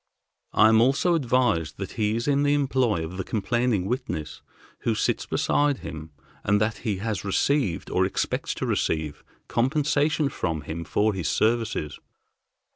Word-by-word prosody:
I 110 - +6
am 110 0 +5
also 140 +8 +3
advised 125 - +1
that 95 -1 -5
he 105 -1 0
is 115 +3 -2
in 140 -1 +3
the 145 0 +3
employ 130 - +1
of 90 +3 -8
the 95 - -2
complaining 115 -1 0
witness 100 - -4 0.4
who - - 0
sits - - -1
beside 145 -2 +1
him, 80 0 -7 0.3
and 105 +1 +2
that 110 +1 0
he 105 -5 -2
has 105 -1 -3
received, 100 - 0
or - - +2
expects - - -1
to - - -3
receive, 80 -2 -1 0.2
compensation 150 +3 +1
from 80 - -2
him 80 +2 -6
for 105 +5 +1
his 90 -6 -3
services. 110 -10 0
110 Hz, 155 wpm, -25 LUFS, 90-130 Hz, 0.4 s, I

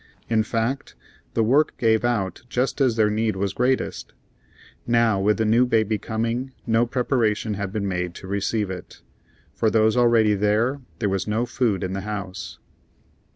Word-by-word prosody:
In 110 -1 +4
fact, 115 +4 -2 0.4
the 115 - +3
work 140 +7 +2
gave 110 -3 +2
out 105 -7 -1
just 130 +3 -1
as 125 -4 +3
their 110 -2 +3
need 110 0 0
was 95 0 -2
greatest. 125 +2 -1 0.7
Now, 115 -4 +3
with 105 +2 +2
the 110 - +1
new 115 +3 +4
baby 110 -3 +1
coming, 115 +4 -3
no 115 +1 +2
preparation 115 -4 0
had 100 -1 -4
been 100 -1 -2
made 90 -2 -2
to - - -10
receive 100 +1 -1
it. 90 - -9 0.5
For 110 - +1
those 110 +1 +3
already 115 -3 +4
there, 110 +7 +1 0.2
there 110 - -1
was 95 +1 -2
no 110 +3 0
food 115 -7 0
in 95 0 -3
the 95 - -3
house. 100 -2 -6
110 Hz, 165 wpm, -23 LUFS, 105-120 Hz, 0.7 s, In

